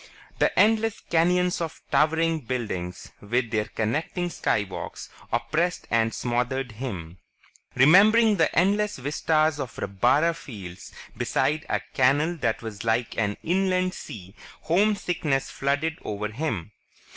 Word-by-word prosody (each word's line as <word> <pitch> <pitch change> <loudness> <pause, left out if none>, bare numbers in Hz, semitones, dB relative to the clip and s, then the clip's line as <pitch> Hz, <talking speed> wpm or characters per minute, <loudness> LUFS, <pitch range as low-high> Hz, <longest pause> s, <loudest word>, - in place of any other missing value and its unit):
The - - +2
endless 225 0 +3
canyons 180 +2 +1
of 165 -2 -4
towering 160 +1 +2
buildings, 110 -8 -4
with 115 +2 -1
their 105 -2 0
connecting 160 - -2
Skywalks, 105 - -3 0.2
oppressed 175 +3 -1
and 115 -1 +2
smothered 125 +2 -2
him. 95 -8 -6 0.6
Remembering 205 - +6
the 160 - +3
endless 205 +4 +2
vistas 155 +2 +1
of 130 -3 -5
rabbara 125 - +2
fields 95 - -10 0.2
beside 155 +1 0
a - - 0
canal 145 +6 +3
that 115 -5 -1
was 110 -2 -6
like 115 +1 0
an 105 -2 0
inland 185 +1 +1
sea, 95 - -9 0.3
homesickness 175 -7 +1
flooded 145 +4 -1
over 105 0 -4
him. 110 - -3
140 Hz, 120 wpm, -25 LUFS, 110-170 Hz, 0.6 s, Remembering